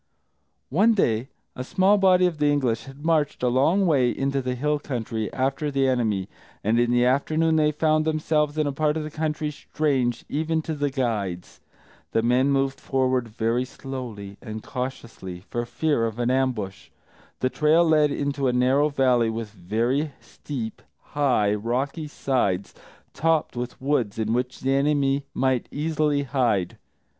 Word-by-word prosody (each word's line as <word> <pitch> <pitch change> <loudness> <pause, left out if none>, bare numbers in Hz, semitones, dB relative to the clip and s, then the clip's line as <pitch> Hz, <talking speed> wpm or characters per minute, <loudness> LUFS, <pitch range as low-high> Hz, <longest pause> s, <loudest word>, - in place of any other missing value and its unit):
One 215 - +4
day, 120 - +1 0.3
a 125 - -4
small 190 +9 +3
body 185 -1 +5
of 170 -4 -1
the 150 - +3
English 130 -6 0
had 135 +3 -11
marched 155 -5 +1
a 125 - +3
long 160 +11 +3
way 135 -7 +3
into 135 +2 -1
the 125 -1 -2
hill 150 +3 0
country, 115 -6 -4
after 135 +3 -1
the 135 -1 +1
enemy, 110 -7 0 0.4
and 110 +3 +2
in 120 0 +2
the 120 0 +3
afternoon 155 +5 +2
they 150 -1 +3
found 155 +1 +2
themselves 155 -1 0
in 155 - +2
a 145 - 0
part 150 +2 0
of 155 - -2
the 155 - -6
country 155 0 -2
strange 135 -5 -1
even 160 +2 -1
to 160 - -3
the 145 -1 -1
guides. 110 -10 -3 0.5
The 115 - +2
men 125 +3 +3
moved 135 -1 +1
forward 130 -2 0
very 115 +2 0
slowly 125 -7 -7
and 110 0 -7
cautiously, 115 -9 -6
for 120 0 -2
fear 145 -5 0
of 110 0 -6
an 120 +1 +1
ambush. 125 -7 -1 0.5
The 130 - 0
trail 155 +3 +4
led 155 -2 +4
into 140 -1 -1
a 125 - +1
narrow 130 +4 +3
valley 125 -5 +2
with 110 -1 -4
very 115 - -1
steep, 120 -7 -7 0.3
high, 125 -8 +2
rocky 130 +8 -2
sides, 120 -10 -1 0.4
topped 160 -1 +1
with 120 0 -5
woods 130 -7 0
in 110 0 0
which 125 +1 -2
the 135 +1 +1
enemy 140 0 +1
might 130 -2 +1
easily 150 -1 0
hide. 120 -9 0
135 Hz, 165 wpm, -24 LUFS, 120-150 Hz, 0.5 s, body